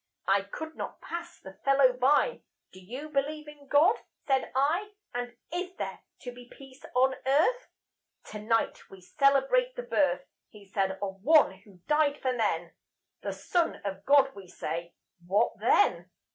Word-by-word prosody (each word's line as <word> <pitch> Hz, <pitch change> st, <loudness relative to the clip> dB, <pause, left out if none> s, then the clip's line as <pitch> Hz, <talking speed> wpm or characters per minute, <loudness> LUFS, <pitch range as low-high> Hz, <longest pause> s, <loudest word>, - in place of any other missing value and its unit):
I 195 Hz, +1 st, +4 dB
could 315 Hz, +11 st, -8 dB
not -, -, -6 dB
pass 340 Hz, 0 st, -7 dB
the 190 Hz, 0 st, -13 dB
fellow 275 Hz, -2 st, +5 dB
by. 275 Hz, -, +2 dB, 0.3 s
"Do 185 Hz, -, -14 dB
you 250 Hz, +11 st, -8 dB
believe 300 Hz, +1 st, -2 dB
in 295 Hz, -1 st, -13 dB
God?" 320 Hz, +11 st, +5 dB, 0.3 s
said 270 Hz, -2 st, +1 dB
I; 335 Hz, +10 st, +1 dB, 0.2 s
"And 245 Hz, 0 st, -4 dB, 0.2 s
is 365 Hz, +1 st, -3 dB
there -, -, -5 dB, 0.2 s
to 245 Hz, -, -6 dB
be 245 Hz, 0 st, -14 dB
Peace 270 Hz, -1 st, -15 dB
on 260 Hz, +1 st, +4 dB
Earth?" 325 Hz, -, +2 dB, 0.5 s
"Tonight 215 Hz, +2 st, -2 dB
we 195 Hz, -, -13 dB
celebrate 275 Hz, -, +2 dB
the -, -, -5 dB
birth," -, -, +1 dB, 0.2 s
He 210 Hz, -2 st, -15 dB
said, 195 Hz, -1 st, -1 dB
"of 195 Hz, -1 st, -5 dB
One 305 Hz, +3 st, +6 dB
who 190 Hz, -4 st, -19 dB
died 300 Hz, -1 st, +2 dB
for 260 Hz, -2 st, 0 dB
men; 175 Hz, -8 st, -1 dB, 0.5 s
The -, -, -3 dB
Son 345 Hz, -2 st, 0 dB
of 195 Hz, 0 st, -4 dB
God, 270 Hz, +1 st, +5 dB
we 195 Hz, -2 st, -11 dB
say. 170 Hz, 0 st, -5 dB, 0.3 s
What 205 Hz, +5 st, +1 dB
then? 180 Hz, -5 st, +3 dB
265 Hz, 160 wpm, -29 LUFS, 200-300 Hz, 0.5 s, One